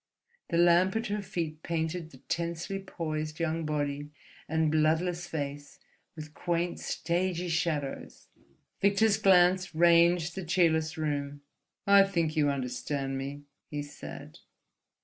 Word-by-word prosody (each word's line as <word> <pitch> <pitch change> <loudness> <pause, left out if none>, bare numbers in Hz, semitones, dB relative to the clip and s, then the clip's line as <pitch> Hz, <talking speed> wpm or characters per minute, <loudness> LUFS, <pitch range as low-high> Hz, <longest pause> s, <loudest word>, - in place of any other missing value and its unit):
The 170 - 0
lamp 175 +3 +4
at 225 +1 -1
her 210 0 -1
feet 165 -5 -4
painted 165 0 -3
the 135 - -15
tensely 170 +3 -2
poised 155 -4 -4
young 165 -1 -1
body 145 -1 -2 0.4
and 160 -1 +1
bloodless 165 +3 +1
face 145 -2 -5 0.4
with 155 -1 -9
quaint, 175 +1 -2
stagey 175 0 -1
shadows. 160 -4 -2 0.6
Victor's 200 +1 +3
glance 180 -1 +4
ranged 170 0 +4
the 190 - -5
cheerless 160 -1 +1
room. 145 -2 -3 0.4
"I 200 0 +7
think 170 -5 -1
you 150 -2 +3
understand 135 +1 -3
me," 140 +2 -6 0.3
he 145 -1 -4
said. 145 - -10
165 Hz, 125 wpm, -29 LUFS, 150-175 Hz, 0.6 s, I